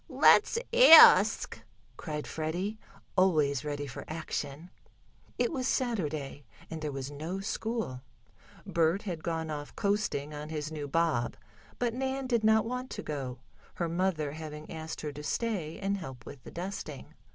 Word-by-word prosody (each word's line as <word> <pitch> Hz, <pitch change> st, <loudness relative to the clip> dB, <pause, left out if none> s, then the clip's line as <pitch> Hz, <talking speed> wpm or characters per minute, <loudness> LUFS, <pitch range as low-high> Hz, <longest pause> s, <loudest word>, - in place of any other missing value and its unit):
"Let's -, -, +5 dB, 0.2 s
ask," 480 Hz, -10 st, +8 dB, 0.3 s
cried 150 Hz, -2 st, -5 dB
Freddie, 175 Hz, +7 st, -3 dB, 0.4 s
always 155 Hz, -7 st, +3 dB
ready 145 Hz, -1 st, -3 dB
for 135 Hz, -, -7 dB
action. 155 Hz, 0 st, -5 dB, 0.7 s
It 245 Hz, -1 st, +1 dB
was 260 Hz, -6 st, -2 dB
Saturday, 155 Hz, -, -2 dB, 0.3 s
and 160 Hz, -1 st, -5 dB
there 150 Hz, -1 st, -3 dB
was 135 Hz, 0 st, -5 dB
no 160 Hz, +6 st, -5 dB
school. 215 Hz, -, -3 dB, 0.6 s
Bert 170 Hz, +4 st, +1 dB
had 175 Hz, -6 st, -5 dB
gone 160 Hz, -1 st, -2 dB
off 145 Hz, -1 st, -6 dB
coasting 200 Hz, -8 st, -1 dB
on 150 Hz, +1 st, -6 dB
his 155 Hz, -1 st, -4 dB
new 150 Hz, -2 st, -5 dB
bob, 155 Hz, -5 st, 0 dB, 0.4 s
but 240 Hz, -2 st, 0 dB
Nan 265 Hz, +1 st, -2 dB
did 235 Hz, -3 st, +1 dB
not 220 Hz, 0 st, +4 dB
want 250 Hz, +2 st, -4 dB
to -, -, -6 dB
go, 130 Hz, -4 st, -5 dB, 0.3 s
her 170 Hz, -, -1 dB
mother 165 Hz, -3 st, 0 dB
having 155 Hz, 0 st, -8 dB
asked 160 Hz, 0 st, -6 dB
her 150 Hz, -, -4 dB
to 145 Hz, +1 st, -8 dB
stay 170 Hz, 0 st, -2 dB
and 200 Hz, 0 st, -1 dB
help 130 Hz, -9 st, -9 dB
with 140 Hz, -, -10 dB
the -, -, -11 dB
dusting. 175 Hz, -5 st, -6 dB
160 Hz, 150 wpm, -30 LUFS, 150-200 Hz, 0.7 s, ask